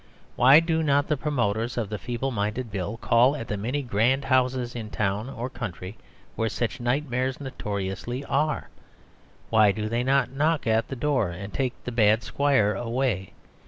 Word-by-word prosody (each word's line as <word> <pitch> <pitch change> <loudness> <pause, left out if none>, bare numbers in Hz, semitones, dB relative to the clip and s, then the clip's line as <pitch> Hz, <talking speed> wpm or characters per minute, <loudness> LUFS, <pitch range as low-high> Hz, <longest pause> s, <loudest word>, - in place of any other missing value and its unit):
Why 135 +5 +7
do 165 -1 0
not 145 -1 +2
the 150 - +3
promoters 120 -6 -1
of 110 -4 -1
the 105 -1 -4
Feeble 120 +7 -3
Minded 110 +2 -2
Bill 100 +2 -3
call 120 +4 +3
at 115 -6 -6
the 105 - -2
many 125 +8 -2
grand 125 +4 +1
houses 130 -2 +1
in 110 -3 -5
town 105 +4 -1
or 120 -2 -4
country 105 -6 -6 0.4
where 115 0 0
such 120 +3 -3
nightmares 130 +1 -1
notoriously 115 0 -4
are? 150 +3 0 0.8
Why 110 -2 +6
do 105 +2 -3
they 120 +2 0
not 135 -2 +2
knock 150 +1 +1
at 110 0 +2
the 135 - -5
door 130 -6 +1
and 100 +4 -7
take 130 -2 -1
the 125 - -4
bad 110 -1 +3
squire 135 -8 +2
away? 120 -5 -2
120 Hz, 170 wpm, -26 LUFS, 110-135 Hz, 0.8 s, Why